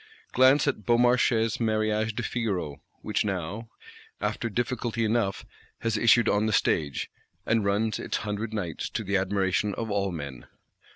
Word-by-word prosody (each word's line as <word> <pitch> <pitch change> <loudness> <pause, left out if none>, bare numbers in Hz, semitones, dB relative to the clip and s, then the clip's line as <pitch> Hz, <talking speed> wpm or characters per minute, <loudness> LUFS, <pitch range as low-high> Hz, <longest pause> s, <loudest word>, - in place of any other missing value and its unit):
Glance 130 +3 +5
at 130 -7 -1
Beaumarchais' 120 0 +3
Mariage 110 -1 0
de - - -2
Figaro; 95 - -2 0.2
which - - 0
now 100 +3 -4 0.5
(in - - -2
1784), - - +4
after 115 +2 -4
difficulty 120 0 -1
enough, 110 -3 0 0.4
has 115 -1 0
issued 115 +1 +5
on 105 +1 +2
the - - 0
stage; 75 -6 0 0.3
and 110 -1 +2
"runs 100 +1 0
its - - -2
hundred 105 +2 -3
nights," 90 -8 -3
to 110 - -3
the 100 0 -1
admiration 95 +1 +1
of 110 -2 -4
all 100 -1 0
men. 70 -7 -7
110 Hz, 160 wpm, -27 LUFS, 100-115 Hz, 0.5 s, Glance